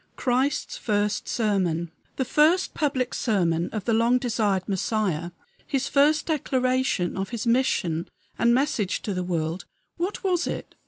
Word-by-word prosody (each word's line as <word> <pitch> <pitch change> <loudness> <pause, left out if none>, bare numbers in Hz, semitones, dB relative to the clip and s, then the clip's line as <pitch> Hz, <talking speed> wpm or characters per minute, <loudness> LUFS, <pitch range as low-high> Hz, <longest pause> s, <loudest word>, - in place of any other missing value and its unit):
XI - - -15
CHRIST'S 260 +3 0
FIRST 210 -1 -1
SERMON 180 -7 0 0.2
The 265 - -1
first 315 +8 +3
public 265 -5 -1
sermon 175 -7 +1
of 215 -4 -4
the 230 - +1
long 230 +3 +4
desired 215 -6 0
Messiah 190 -4 -1 0.4
his 270 -1 -1
first 295 +2 +3
declaration 255 - 0
of 195 0 -3
his 235 -2 -4
mission 230 -9 +1 0.3
and 235 - +4
message 240 -7 0
to 205 - -2
the 180 -1 -2
world 170 -1 -2 0.3
what 370 +6 -3
was 360 -3 +1
it? - - -5
230 Hz, 150 wpm, -25 LUFS, 185-265 Hz, 0.4 s, long